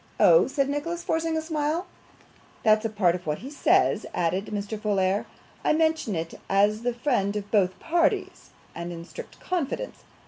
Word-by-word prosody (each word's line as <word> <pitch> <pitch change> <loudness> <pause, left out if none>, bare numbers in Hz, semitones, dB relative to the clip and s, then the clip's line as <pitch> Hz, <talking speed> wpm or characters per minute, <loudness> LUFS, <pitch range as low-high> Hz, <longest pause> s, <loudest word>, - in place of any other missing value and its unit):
'Oh!' - - +6
said 275 -2 0
Nicholas, 315 +5 -3
forcing 325 0 0
a 315 - -2
smile. 315 +2 -1 0.8
'That's 215 0 +4
a - - +1
part 200 -5 +2
of 180 -2 -6
what 150 0 0
he 265 +4 -9
says,' 290 - +3
added 180 +4 0
Mr. 205 +1 -3
Folair. 200 -2 +1 0.4
'I - - +3
mention 315 - +1
it 165 0 -3 0.2
as 205 +2 +3
the 245 0 -1
friend 235 -6 0
of 205 -1 -5
both 190 -4 +2
parties, 355 +3 0 0.2
and 170 +1 -5
in 170 -1 -7
strict - - -10
confidence. 365 - -3
225 Hz, 170 wpm, -26 LUFS, 195-320 Hz, 0.8 s, Oh